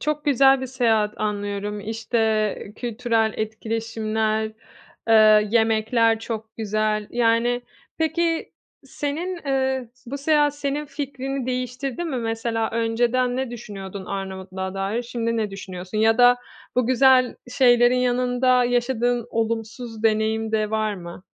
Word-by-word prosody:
çok 300 Hz, 0 st, -2 dB
güzel 270 Hz, -1 st, +5 dB
bir 260 Hz, -, -3 dB
seyahat 225 Hz, -5 st, +1 dB
anlıyorum. 205 Hz, 0 st, -3 dB
İşte, 220 Hz, -1 st, -1 dB
kültürel 230 Hz, -2 st, 0 dB
etkileşimler, 220 Hz, 0 st, -2 dB, 0.6 s
eee, 215 Hz, -1 st, +6 dB
yemekler 225 Hz, 0 st, +3 dB
çok 220 Hz, -1 st, -6 dB
güzel. 215 Hz, -1 st, -1 dB
Yani, 240 Hz, +1 st, +2 dB, 0.4 s
peki 330 Hz, +1 st, 0 dB, 0.3 s
senin 310 Hz, +7 st, -3 dB
eee, 265 Hz, -2 st, 0 dB, 0.2 s
bu 275 Hz, +4 st, -5 dB
seyahat 295 Hz, 0 st, +2 dB
senin 290 Hz, +1 st, -2 dB
fikrini 270 Hz, -2 st, -4 dB
değiştirdi 255 Hz, +4 st, -3 dB
mi? 310 Hz, -6 st, -3 dB
Mesela 225 Hz, -1 st, -2 dB
önceden 240 Hz, +2 st, +1 dB
ne 265 Hz, -2 st, -2 dB
düşünüyordun 200 Hz, -4 st, -7 dB
Arnavutluk'a 190 Hz, -1 st, -5 dB
dair, 195 Hz, +5 st, -2 dB
şimdi 230 Hz, -1 st, -2 dB
ne 215 Hz, -2 st, -1 dB
düşünüyorsun? 190 Hz, 0 st, -6 dB
Ya 225 Hz, +1 st, +3 dB
da 245 Hz, 0 st, +7 dB, 0.4 s
bu 250 Hz, -2 st, +2 dB
güzel 260 Hz, 0 st, +4 dB, 0.2 s
şeylerin 245 Hz, -1 st, +5 dB
yanında 250 Hz, 0 st, +2 dB
yaşadığın 245 Hz, -1 st, 0 dB
olumsuz 225 Hz, 0 st, -3 dB
deneyim 220 Hz, 0 st, +1 dB
de 215 Hz, -1 st, 0 dB
var 215 Hz, -1 st, 0 dB
mı? 175 Hz, -1 st, -9 dB
230 Hz, 120 wpm, -23 LUFS, 215-255 Hz, 0.6 s, da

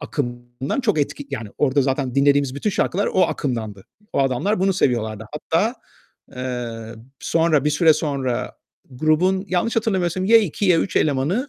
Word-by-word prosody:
akımdan 120 Hz, -, -4 dB
çok 210 Hz, -10 st, +1 dB
etki 145 Hz, 0 st, -3 dB
yani 110 Hz, -6 st, -5 dB
orda 140 Hz, -1 st, +2 dB
zaten 130 Hz, -1 st, -1 dB
dinlediğimiz 140 Hz, -1 st, +3 dB
bütün 205 Hz, +9 st, -1 dB
şarkılar 195 Hz, +1 st, 0 dB
o 185 Hz, -, +3 dB
akımdandı. 110 Hz, -, -2 dB, 0.3 s
O -, -, -1 dB
adamlar 135 Hz, -, 0 dB
bunu 195 Hz, 0 st, +3 dB
seviyorlardı. 110 Hz, -, 0 dB
Hatta, 170 Hz, +10 st, 0 dB, 0.6 s
eee, 120 Hz, -3 st, -5 dB, 0.3 s
sonra, 165 Hz, -4 st, +2 dB
bir 150 Hz, -, +2 dB
süre 160 Hz, +2 st, +5 dB
sonra 140 Hz, -5 st, -2 dB, 0.3 s
grubun 155 Hz, +8 st, +1 dB
yanlış 185 Hz, +6 st, 0 dB
hatırlamıyorsam, 185 Hz, -5 st, 0 dB
ya 230 Hz, +3 st, +6 dB
2 205 Hz, -1 st, -2 dB
ya 175 Hz, -3 st, +5 dB
3 -, -, -3 dB
elemanı, 155 Hz, -, +1 dB
145 Hz, 150 wpm, -21 LUFS, 125-185 Hz, 0.6 s, ya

